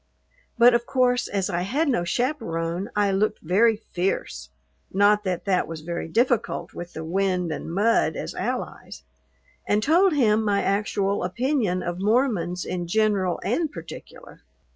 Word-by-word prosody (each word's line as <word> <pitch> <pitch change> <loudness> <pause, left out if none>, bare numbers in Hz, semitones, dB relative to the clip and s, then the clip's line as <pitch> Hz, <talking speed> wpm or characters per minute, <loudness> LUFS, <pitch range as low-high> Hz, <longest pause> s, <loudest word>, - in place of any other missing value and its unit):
But, 240 +1 +7
of 235 0 0
course, 250 -1 +2
as 195 -2 -1
I 175 0 -2
had 275 - 0
no 240 -10 +1
chaperone 185 - -2
I 205 -1 +2
looked 210 +2 +1
very 210 +7 +3
fierce 185 - -3 0.4
(not 205 +2 +3
that 185 -2 -2
that 190 -2 +1
was 160 -1 -7
very 170 +1 -4
difficult 235 +5 0
with 175 0 -8
the 160 - -6
wind 180 0 0
and 155 +1 -5
mud 210 +6 +2
as - - -5
allies) - - -5 0.6
and 210 +1 +2
told 350 - +4
him 220 -6 +3
my 205 -2 +1
actual 200 0 0
opinion 215 -2 0
of 175 0 -4
Mormons 200 -5 0
in 175 -1 -4
general 200 -2 +1
and 320 -3 0
particular. - - -11
200 Hz, 150 wpm, -24 LUFS, 180-235 Hz, 0.6 s, But